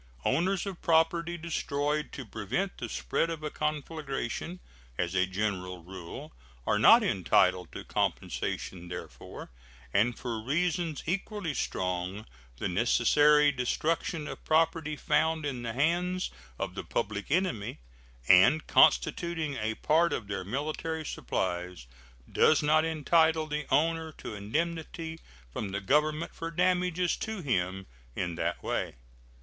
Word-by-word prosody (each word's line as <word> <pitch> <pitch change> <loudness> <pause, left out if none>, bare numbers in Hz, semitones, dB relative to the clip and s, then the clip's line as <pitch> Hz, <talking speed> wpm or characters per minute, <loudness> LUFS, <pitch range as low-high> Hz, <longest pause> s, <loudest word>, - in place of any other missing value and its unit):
Owners 180 +8 +1
of 195 -3 -6
property 170 +1 +2
destroyed 150 -2 -2
to 135 - -6
prevent 115 - -3
the - - -4
spread 165 - -1
of 160 -2 -5
a 150 - -3
conflagration, 150 +1 -3 0.4
as 90 +1 -1
a 95 0 +2
general 95 -3 -3
rule, 90 -5 -9 0.3
are - - +2
not - - +8
entitled 90 -1 +2
to - - -6
compensation 90 -2 -2
therefor; 90 - -8 0.4
and 115 +4 +2
for 115 -3 -4
reasons 165 +4 -1
equally 195 -1 -2
strong 90 -2 -2 0.3
the - - -2
necessary 145 +9 +4
destruction 150 +4 -1
of - - -8
property 160 -1 +2
found 160 +1 +1
in 130 -4 -3
the 115 -1 -4
hands 175 +7 0 0.3
of - - -3
the - - -5
public 105 -1 -3
enemy, 165 - 0 0.5
and 95 +12 +6
constituting 160 0 +3
a 110 -3 -2
part 165 +7 +3
of 110 - -3
their 100 -2 -4
military 155 - -3
supplies, 90 - -3 0.4
does 155 -1 +4
not 155 +1 +4
entitle 160 0 +3
the 150 -1 -4
owner 160 +3 +2
to 115 - -8
indemnity 160 - -3 0.3
from 105 - -3
the 100 +1 -2
Government 150 +9 +1
for 165 - -5
damages 180 0 +1
to 220 -3 -4
him 95 -7 -1 0.3
in 90 -1 -2
that - - -2
way. - - -2
150 Hz, 130 wpm, -29 LUFS, 105-165 Hz, 0.5 s, not